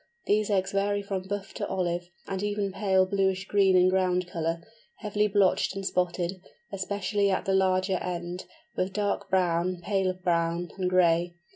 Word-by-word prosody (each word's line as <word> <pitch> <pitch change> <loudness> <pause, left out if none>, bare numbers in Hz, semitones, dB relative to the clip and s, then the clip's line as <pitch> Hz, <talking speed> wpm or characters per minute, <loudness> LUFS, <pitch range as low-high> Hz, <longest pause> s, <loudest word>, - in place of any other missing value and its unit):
These 210 0 +2
eggs 190 -2 +1
vary 205 +1 0
from 190 -2 -4
buff 200 0 -4
to - - -3
olive, 175 -1 -2 0.2
and 195 -1 -3
even 205 -1 -1
pale 190 -1 +2
bluish 190 0 0
green 195 -2 +4
in 180 0 +5
ground 185 -1 +2
colour, 165 -1 -3 0.3
heavily 210 -1 0
blotched 195 -1 +2
and 195 0 -5
spotted, 180 0 -1 0.3
especially 200 +1 -1
at 190 - 0
the 195 - +1
larger 185 0 +2
end, 175 0 -5 0.3
with 185 +1 -1
dark 205 0 -1
brown, 180 -1 +1
paler 190 +1 0
brown, 170 -1 -1
and 185 -1 -1
gray. 175 -1 +3
185 Hz, 160 wpm, -27 LUFS, 180-195 Hz, 0.3 s, in